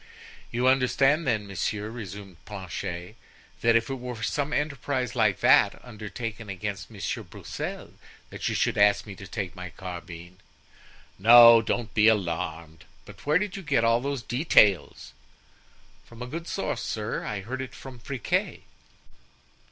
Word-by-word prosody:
"You 125 Hz, +2 st, +1 dB
understand, 135 Hz, +4 st, +3 dB
then, 110 Hz, -4 st, 0 dB
monsieur," 105 Hz, +2 st, -3 dB
resumed 100 Hz, -5 st, -9 dB
Planchet, 90 Hz, -1 st, -6 dB, 0.5 s
"that 115 Hz, 0 st, +4 dB
if 115 Hz, 0 st, +2 dB
it 135 Hz, -, -3 dB
were 125 Hz, 0 st, -6 dB
for 110 Hz, -, -8 dB
some 145 Hz, +5 st, -1 dB
enterprise 140 Hz, -4 st, -2 dB
like 110 Hz, -6 st, +2 dB
that -, -, +5 dB
undertaken 110 Hz, -1 st, -7 dB
against 100 Hz, +1 st, -5 dB
Monsieur -, -, -4 dB
Broussel -, -, -7 dB, 0.4 s
that -, -, -3 dB
you -, -, -2 dB
should -, -, +1 dB
ask 105 Hz, 0 st, +4 dB
me 105 Hz, -, -8 dB
to 100 Hz, 0 st, -11 dB
take 95 Hz, -3 st, -5 dB
my 90 Hz, -1 st, -7 dB
carbine——" 90 Hz, 0 st, -9 dB, 0.8 s
"No, 115 Hz, +2 st, +9 dB
don't 115 Hz, -1 st, -3 dB
be 110 Hz, 0 st, +4 dB
alarmed; 85 Hz, -6 st, -1 dB, 0.2 s
but -, -, -14 dB
where 150 Hz, +2 st, +5 dB
did 205 Hz, 0 st, -3 dB
you 195 Hz, -, -6 dB
get 145 Hz, -9 st, +1 dB
all 115 Hz, +1 st, +3 dB
these 140 Hz, -2 st, -3 dB
details?" 110 Hz, -, +2 dB, 0.9 s
"From 115 Hz, +1 st, -10 dB
a -, -, -5 dB
good 165 Hz, +7 st, -6 dB
source, 195 Hz, -, -3 dB
sir; 110 Hz, +1 st, -3 dB
I 105 Hz, -2 st, -4 dB
heard 130 Hz, +6 st, -5 dB
it 130 Hz, -, -7 dB
from 130 Hz, -2 st, -11 dB
Friquet." 125 Hz, 0 st, -2 dB
115 Hz, 150 wpm, -26 LUFS, 100-125 Hz, 0.9 s, No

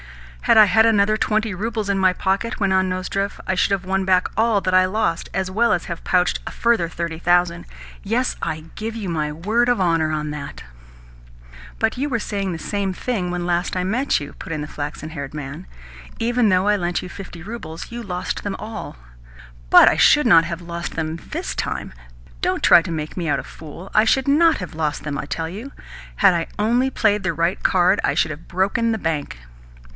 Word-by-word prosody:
"Had -, -, +5 dB
I 215 Hz, -, +9 dB
had 220 Hz, +3 st, +4 dB
another 215 Hz, -1 st, +3 dB
twenty 215 Hz, -1 st, 0 dB
roubles 215 Hz, +2 st, -3 dB
in 200 Hz, -1 st, 0 dB
my 185 Hz, -1 st, +4 dB
pocket," 195 Hz, +5 st, -1 dB
went 195 Hz, -2 st, +1 dB
on 190 Hz, 0 st, +2 dB
Nozdrev, 195 Hz, +2 st, -3 dB
"I 190 Hz, -, 0 dB
should 185 Hz, -, +1 dB
have 195 Hz, -2 st, 0 dB
won 190 Hz, +1 st, 0 dB
back 185 Hz, -1 st, +3 dB
all 220 Hz, 0 st, +3 dB
that 185 Hz, -, -1 dB
I 185 Hz, -, +7 dB
have 185 Hz, 0 st, 0 dB
lost, 205 Hz, -6 st, -1 dB
as 190 Hz, 0 st, -1 dB
well 235 Hz, +4 st, +2 dB
as 175 Hz, -, 0 dB
have 170 Hz, -1 st, -6 dB
pouched 180 Hz, -1 st, +2 dB
a -, -, -4 dB
further 230 Hz, -8 st, +1 dB
thirty 170 Hz, -1 st, -4 dB
thousand. 175 Hz, 0 st, +2 dB, 0.4 s
Yes, 235 Hz, +5 st, 0 dB
I 155 Hz, 0 st, -3 dB
give 220 Hz, +1 st, -5 dB
you 215 Hz, -4 st, -5 dB
my 155 Hz, -3 st, -1 dB
word 215 Hz, +10 st, 0 dB
of 245 Hz, -, +2 dB
honour 165 Hz, -4 st, +2 dB
on 150 Hz, -1 st, -2 dB
that." 150 Hz, -1 st, -7 dB, 1.1 s
"But 225 Hz, +2 st, 0 dB
you 285 Hz, +3 st, -1 dB
were 235 Hz, -4 st, 0 dB
saying 200 Hz, -3 st, -3 dB
the 170 Hz, -, -4 dB
same 200 Hz, 0 st, -2 dB
thing 195 Hz, -3 st, -2 dB
when 175 Hz, 0 st, -3 dB
last 175 Hz, +1 st, -1 dB
I 180 Hz, -, 0 dB
met 245 Hz, +9 st, +1 dB
you," 145 Hz, -1 st, -8 dB
put 185 Hz, -, -9 dB
in 155 Hz, -2 st, -2 dB
the 150 Hz, -, -5 dB
flaxen 150 Hz, +1 st, -6 dB
haired 140 Hz, -2 st, -6 dB
man. 140 Hz, -, -7 dB, 0.4 s
"Yet, -, -, -18 dB
even 240 Hz, -1 st, +2 dB
though 185 Hz, +1 st, +2 dB
I 210 Hz, -, +4 dB
lent 175 Hz, -3 st, -2 dB
you -, -, -6 dB
fifty 180 Hz, -3 st, -9 dB
roubles, 185 Hz, -6 st, -8 dB
you 240 Hz, 0 st, -5 dB
lost 180 Hz, -4 st, -4 dB
them 200 Hz, -1 st, -3 dB
all." 215 Hz, -, -7 dB, 0.7 s
"But -, -, +8 dB
I -, -, +5 dB
should 295 Hz, -2 st, +5 dB
not 170 Hz, -8 st, +7 dB
have 170 Hz, +1 st, -5 dB
lost 170 Hz, 0 st, -5 dB
them 160 Hz, 0 st, -3 dB
THIS -, -, -5 dB
time. -, -, -4 dB, 0.5 s
Don't -, -, 0 dB
try -, -, +7 dB
to 170 Hz, -, -6 dB
make 155 Hz, -1 st, -4 dB
me 170 Hz, -3 st, -2 dB
out -, -, +1 dB
a -, -, -6 dB
fool. 165 Hz, +4 st, -11 dB
I -, -, +5 dB
should 265 Hz, +4 st, +2 dB
NOT 320 Hz, +3 st, +4 dB
have 180 Hz, -5 st, -7 dB
lost 155 Hz, -2 st, -2 dB
them, 145 Hz, -2 st, -3 dB
I -, -, -4 dB
tell 160 Hz, +2 st, -3 dB
you. 215 Hz, +11 st, -8 dB, 0.5 s
Had 195 Hz, -2 st, +5 dB
I 170 Hz, -1 st, -1 dB
only 240 Hz, +5 st, +2 dB
played 210 Hz, -5 st, +1 dB
the 190 Hz, -2 st, 0 dB
right 170 Hz, +4 st, 0 dB
card, 185 Hz, +2 st, +3 dB
I -, -, +1 dB
should 155 Hz, -, +1 dB
have 155 Hz, +2 st, -9 dB
broken 200 Hz, +6 st, 0 dB
the 220 Hz, -, 0 dB
bank." 160 Hz, -, -3 dB
185 Hz, 220 wpm, -21 LUFS, 165-215 Hz, 1.1 s, I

